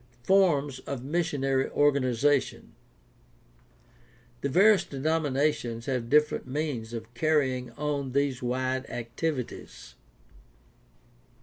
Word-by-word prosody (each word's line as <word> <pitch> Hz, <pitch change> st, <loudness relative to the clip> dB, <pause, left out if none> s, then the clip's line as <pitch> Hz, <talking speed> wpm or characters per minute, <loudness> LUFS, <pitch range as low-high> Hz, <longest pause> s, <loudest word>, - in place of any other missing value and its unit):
FORMS 145 Hz, -7 st, +3 dB
OF 135 Hz, -3 st, -4 dB
MISSIONARY 135 Hz, -4 st, 0 dB
ORGANIZATION 140 Hz, -1 st, +1 dB, 1.7 s
The 140 Hz, -, -1 dB
various 195 Hz, +6 st, +5 dB
denominations 140 Hz, -5 st, -1 dB
have 125 Hz, -3 st, -2 dB
different 150 Hz, -1 st, +2 dB
means 130 Hz, -5 st, -3 dB
of 115 Hz, 0 st, -7 dB
carry 145 Hz, 0 st, +2 dB
ing 125 Hz, -1 st, -6 dB
on 140 Hz, -1 st, -3 dB
these 140 Hz, -2 st, 0 dB
wide 130 Hz, +1 st, -2 dB
activities. 125 Hz, +3 st, -5 dB
140 Hz, 90 wpm, -28 LUFS, 125-150 Hz, 1.7 s, various